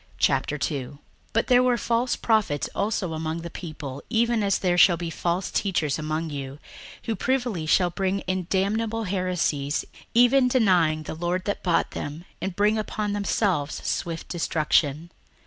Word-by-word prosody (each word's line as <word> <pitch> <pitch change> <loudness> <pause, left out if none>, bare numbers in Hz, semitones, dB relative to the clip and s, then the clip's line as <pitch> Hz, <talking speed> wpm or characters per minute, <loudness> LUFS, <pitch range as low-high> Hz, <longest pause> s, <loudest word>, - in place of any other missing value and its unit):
61:002:001 140 -2 0 0.3
But 230 - +1
there 250 0 +5
were 250 -1 +3
false 235 +2 0
prophets 205 - +1
also 200 -4 -1
among 160 +1 -3
the 170 0 -7
people, 150 -6 -7
even 235 0 +2
as 200 -1 +2
there 180 -2 +1
shall 175 -1 +6
be 170 0 -4
false 175 +3 -1
teachers 165 -7 0
among 155 +1 -2
you, 140 -1 -6 0.5
who 225 - -2
privily 240 -7 -1
shall 175 +2 +3
bring 195 +2 -1
in 185 -2 -2
damnable 220 +4 0
heresies, 180 -7 -1 0.3
even 250 +2 +5
denying 180 -11 +3
the - - -5
Lord 175 +3 -2
that 205 - -2
bought 175 -2 +1
them, 150 +4 -6 0.2
and 190 -2 -3
bring 210 +2 +2
upon 210 -1 -2
themselves 195 -7 0
swift 165 -1 -3
destruction. 160 -1 0
180 Hz, 150 wpm, -25 LUFS, 155-215 Hz, 0.5 s, shall